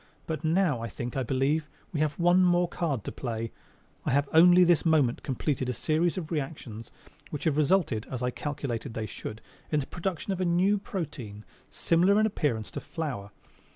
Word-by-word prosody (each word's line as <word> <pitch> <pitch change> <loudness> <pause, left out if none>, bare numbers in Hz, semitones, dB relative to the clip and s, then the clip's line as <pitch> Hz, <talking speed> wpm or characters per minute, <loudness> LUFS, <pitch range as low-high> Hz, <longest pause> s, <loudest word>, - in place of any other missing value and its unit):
But 160 -1 -4
now, 160 -6 +2
I 115 - -3
think, 120 +1 -6
I 135 - 0
believe, 135 +5 0 0.2
we 155 - -1
have 150 -1 0
one 175 +1 +4
more 175 0 +3
card 150 - -2
to - - -5
play. 115 -2 -4 0.5
I - - -1
have 140 +2 +2
only 175 +3 +8
this 175 -3 +4
moment 150 -7 +3
completed 130 -1 -2
a - - 0
series 160 - 0
of 165 -3 -5
reactions 135 -7 -5 0.4
which 150 - -5
have 155 -3 +2
resulted 155 - +2
(as 130 -1 -4
I 125 - +1
calculated 135 -6 -4
they 110 - -2
should) 110 0 -7 0.3
in 150 - +3
the 135 - -3
production 180 +3 -3
of 185 - -4
a - - +2
new 185 +4 +3
protein, 140 - -6 0.2
similar 180 +5 +3
in 215 - +4
appearance 135 - -1
to - - -5
flour. 140 - -5
150 Hz, 190 wpm, -28 LUFS, 125-175 Hz, 0.5 s, only